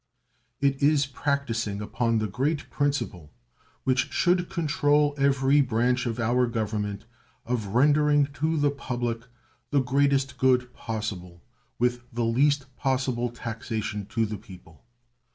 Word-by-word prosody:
It 140 -1 +1
is 145 0 +4
practicing 130 -7 -2
upon 115 +2 0
the 110 - 0
great 135 - -2
principle 140 - -2 0.5
which 130 -1 +1
should 175 -1 +2
control 150 -4 +2
every 140 0 +3
branch 125 0 +1
of 115 0 -3
our 120 +2 +2
Government 105 -3 -3 0.4
of 115 -4 -3
rendering 145 +2 +4
to 155 +3 0
the 145 -1 +2
public 120 -4 -3 0.4
the 145 - +3
greatest 135 0 +1
good 125 -1 +2
possible 100 -6 -5 0.3
with 125 0 +1
the 120 0 -1
least 135 +4 +2
possible 130 -3 0
taxation 110 -3 -4
to 115 -1 0
the 105 -1 -5
people. 90 0 -15
125 Hz, 125 wpm, -26 LUFS, 115-140 Hz, 0.5 s, is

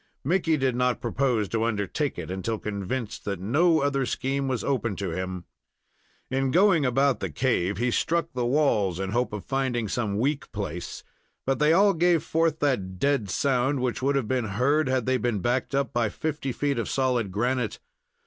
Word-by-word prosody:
Mickey 165 +1 +2
did 130 -3 0
not 125 -1 +1
propose 120 -3 0
to 115 -1 0
undertake 115 - -1
it - - -5
until 95 +4 -2
convinced 105 +3 -4
that 100 -3 -3
no 155 - +3
other 140 -1 +1
scheme 135 +2 -1
was 130 -3 -1
open 120 -6 -1
to 95 -3 -3
him. 90 0 -4 0.9
In 135 0 +1
going 170 -2 +4
about 135 -1 +2
the - - -3
cave, 105 -7 0
he 120 +2 0
struck 165 +5 0
the 125 -1 -1
walls 120 - +2
in 95 0 -2
the - - -4
hope 125 +1 0
of 105 -2 -6
finding 130 -4 -1
some 105 -2 -1
weak 145 +6 -1
place, 90 -5 -5 0.4
but 135 0 0
they 150 +1 +4
all 200 +4 +5
gave 170 -1 +3
forth 165 -1 +1
that 100 -11 0
dead 140 -4 +1
sound 135 +5 +1
which 125 -1 -1
would 140 +2 +1
have 135 -5 0
been 125 -1 0
heard 125 +9 +1
had 130 -3 +1
they 130 0 +2
been 120 -2 -1
backed 125 +6 -1
up 140 -1 0
by 120 -2 +1
fifty 150 -1 -3
feet 140 0 -1
of 115 - -2
solid 125 -6 0
granite. 125 +6 -1
125 Hz, 190 wpm, -26 LUFS, 105-140 Hz, 0.9 s, all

